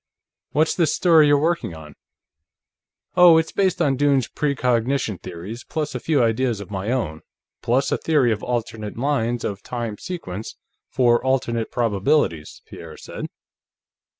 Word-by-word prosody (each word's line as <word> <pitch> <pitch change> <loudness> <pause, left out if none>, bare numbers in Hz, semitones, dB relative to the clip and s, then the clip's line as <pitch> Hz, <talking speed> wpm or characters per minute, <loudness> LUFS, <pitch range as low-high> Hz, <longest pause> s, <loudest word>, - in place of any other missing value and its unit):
What's 155 +2 +2
this 165 -4 +1
story 165 -4 +5
you're 145 0 +5
working 160 - -1
on?" 75 -2 -11 1.2
"Oh, 175 -2 +8
it's 160 0 0
based 190 -3 +1
on 135 -4 +1
Dunne's 140 -3 +2
precognition 125 -5 0
theories, 95 +7 -8
plus 155 -2 -4
a - - -3
few 145 -6 +1
ideas 115 0 0
of 100 - -9
my 100 +2 -3
own, 110 -12 -2 0.4
plus 130 +4 +1
a - - 0
theory 145 -7 +2
of 105 -1 -2
alternate 115 -3 -4
lines 120 -3 -1
of 100 -1 -4
time 115 -4 -5
sequence 110 - -6 0.3
for 120 -2 +2
alternate 120 -4 0
probabilities," 105 - 0
Pierre - - -11
said. - - -7
125 Hz, 145 wpm, -22 LUFS, 110-145 Hz, 1.2 s, Oh